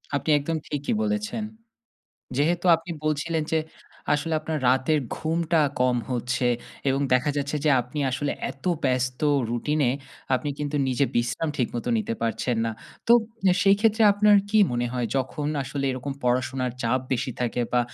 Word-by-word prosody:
আপনি 150 - -2
একদম 160 +3 -2
ঠিকই 145 +7 -2
বলেছেন। 215 +1 -2 0.9
যেহেতু 170 +5 +1
আপনি 165 +2 -10
বলছিলেন 155 +1 0
যে 160 - +4 0.6
আসলে 160 +2 -1
আপনার 155 0 -3
রাতের 130 +4 +3 0.2
ঘুমটা 165 0 +1 0.2
কম 125 -1 +3
হচ্ছে। 125 0 0 0.4
এবং 135 +1 +1
দেখা 125 +4 +2
যাচ্ছে 145 +1 -1
যে 150 - +4
আপনি 125 +5 -7
আসলে 140 +3 -1 0.2
এতো 155 +7 -3
ব্যস্ত 125 0 0 0.3
রুটিনে 140 +2 +1 0.4
আপনি 145 +3 -1
কিন্তু 145 0 -2
নিজে 130 +2 +2
বিশ্রাম 120 +7 0
ঠিকমতো 120 -1 -2
নিতে 115 - -2
পারছেন 115 +1 -1
না। 115 - -1 0.3
তো 235 - +6 0.3
নে 185 - +6
সেইক্ষেত্রে 210 +3 +4
আপনার 205 0 +5
কি 215 - +4
মনে 120 0 0
হয় 125 -2 -1
যখন 135 +3 -2 0.2
আসলে 140 +1 -4
এরকম 130 +2 -4
পড়াশুনার 125 0 0
চাপ 125 +3 +1
বেশি 130 +1 -1
থাকে 120 0 -1
বা 125 - +4
140 Hz, 155 wpm, -25 LUFS, 125-160 Hz, 0.9 s, তো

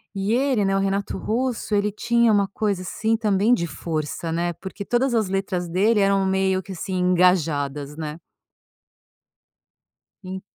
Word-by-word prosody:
e 195 +3 0
ele, 255 -4 +2
né, 195 0 +1
o - - +2
Renato 195 +1 -1
Russo 235 -1 -2
ele 205 0 +1
tinha 235 +1 +2
uma 200 -2 +3
coisa 200 -2 -2
assim, 220 +4 -1
também 210 +1 +2
de 170 -8 0
força, 155 +2 -4
né, 175 +1 -1
porque 195 +3 -8
todas 245 +1 +1
as 220 -4 +2
letras 190 -2 -2
dele 205 +6 +2
eram 195 -1 +3
meio 190 0 +1
que 195 - -11
assim, 185 +2 -5
engajadas, 160 -6 +1
né. 155 0 -5 2.1
En 190 +1 -6
195 Hz, 155 wpm, -23 LUFS, 175-215 Hz, 2.1 s, uma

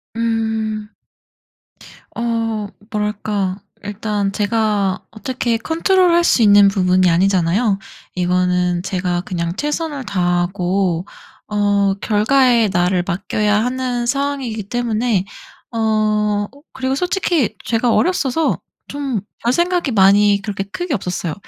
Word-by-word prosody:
음. 220 -2 -1 1.3
어 225 -2 -1 0.2
뭐랄까 210 -2 -2 0.3
일단 205 -1 -2
제가 205 -2 0
어떻게 235 0 -2
컨트롤할 345 - +2
수 255 - +3
있는 205 -2 +7
부분이 185 -2 +3
아니잖아요, 190 +4 +2 0.4
이거는 180 -1 +1
제가 180 -2 -1
그냥 170 -1 -3
최선을 295 -1 -3
다하고 180 -1 0 0.4
어 205 -1 +2
결과에 230 +1 +3
나를 180 0 +1
맡겨야 210 +4 0
하는 250 -1 -2
상황이기 270 -4 -2
때문에. 230 -4 0 0.5
어 215 -2 +1 0.2
그리고 265 0 -2
솔직히 355 - 0
제가 230 0 +1
어렸어서 320 -4 +1 0.3
좀 275 -8 -3 0.2
별 240 - +2
생각이 345 -2 +1
많이 200 0 +4
그렇게 200 -1 -3
크게 315 - -4
없었어요. 180 -4 -3
210 Hz, 245 characters per minute, -18 LUFS, 195-245 Hz, 1.3 s, 있는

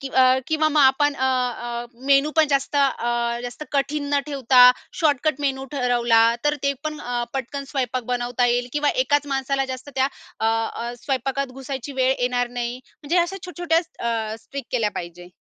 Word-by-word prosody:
की 275 - -5
अ, 260 0 +4
किंवा 310 0 +2
मग 305 0 +2
आपण 285 +2 +4
अ, 260 - -2
अ, 240 -2 -1 0.2
मेनू 280 +2 +4
पण 315 -1 +5
जास्त 275 0 0
अ, 240 -4 +1
जास्त 245 +5 -6
कठीण 285 +1 0
न 285 - +3
ठेवता, 265 -3 +3 0.4
शॉर्टकट 300 -2 +1
मेनू 270 -2 -1
ठरवला 240 -4 +3 0.2
तर 295 - +3
ते 280 0 +2
पण 305 -1 -3
अ, 240 -1 -2
पटकन 270 +2 -4
स्वयंपाक 255 -2 -1
बनवता 245 0 0
येईल. 245 +1 +1
किंवा 295 0 +2
एकाच 290 - +1
माणसाला 270 0 0
जास्त 255 +2 -8
त्या 265 +1 +2 0.3
अ, 220 - +1
अ, 225 +1 -1
स्वयंपाकात 270 0 -2
घुसायची 270 +1 -5
वेळ 260 +1 +3
येणार 245 0 0
नाही. 240 +1 -3 0.2
म्हणजे 330 +5 +1
अशा 345 +3 0
छोट-छोट्या 350 -2 0 0.3
अ, 220 -1 -2 0.2
ट्रिक 280 0 -5
केल्या 230 -5 +1
पाहिजे. 175 +1 -7
265 Hz, 175 wpm, -23 LUFS, 245-285 Hz, 0.4 s, पण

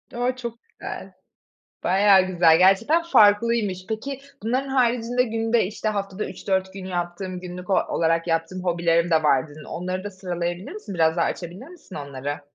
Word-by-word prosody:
O! 245 +1 0
Çok 235 -2 -7
güzel. - - -8 0.7
Bayağı 195 +1 +5
güzel. 170 -3 +4
Gerçekten 195 - +4
farklıymış. 210 - +3
Peki, 260 +5 -4 0.2
"Bunların 255 +5 -1
haricinde 245 -1 +2
günde, 225 0 +1
işte, 215 +3 -4
haftada 200 -1 -3
3-4 190 -1 -2
gün 190 -1 -8
yaptığım 180 +1 -4
günlük 180 0 -8
o - - +3
olarak 165 -1 +1
yaptığım 165 +2 -1
hobilerim 170 -1 +1
de 160 -1 +3
var." 140 -1 +3
dedin. 150 +1 -12
Onları 185 +2 -4
da 205 - -4
sıralayabilir 175 -1 -4
misin? 415 - -7
Biraz 160 0 +2
daha 170 - +3
açabilir 180 - -5
misin 340 - -13
onları? 140 0 -5
190 Hz, 160 wpm, -24 LUFS, 175-225 Hz, 0.7 s, Bayağı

